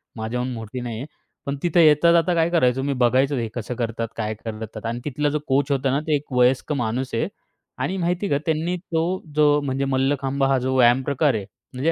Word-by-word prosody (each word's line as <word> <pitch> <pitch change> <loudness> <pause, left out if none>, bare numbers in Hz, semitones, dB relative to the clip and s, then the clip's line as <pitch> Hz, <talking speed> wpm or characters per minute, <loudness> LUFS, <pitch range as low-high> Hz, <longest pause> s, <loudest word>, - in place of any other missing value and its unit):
माझ्याहून 125 +3 -3
मोठी 115 +2 -6
नाही 120 -2 -5
आहे. 125 - -5 0.4
पण 140 - -2
तिथं 175 0 +2
येता-जाता 170 +2 +5
काय 165 0 +2
करायचो 135 -6 +2
मी, 140 0 0
बघायचं 130 +2 +2
तो - - -1
हे 115 - -2
कसं 120 +1 -5
करतात, 115 -1 -2
काय 110 -1 -2
करतात 110 0 -7
आणि, 115 +1 -2
तिथला 150 +1 0
जो 150 +1 -1
कोच 140 +1 +1
होता 135 -1 +1
ना, 140 - +1
ते 155 - +3
एक 145 0 -5
वयस्क 125 +3 +2
माणूस 125 0 -2
आहे. 115 - 0 0.5
आणि 190 - -2
माहिती 180 +2 -1
का 140 - +2
त्यांनी 160 +2 0
तो 165 -2 -2 0.3
जो 150 -1 +4
म्हणजे, 135 -1 -1
मल्लखांब 135 0 0
हा 135 0 +3
जो 130 +1 -1
व्यायाम 120 +1 +5
प्रकार 140 +1 +1
आहे. 105 -3 -3 0.3
म्हणजे, 135 +6 +1
135 Hz, 210 wpm, -23 LUFS, 120-150 Hz, 0.5 s, येता-जाता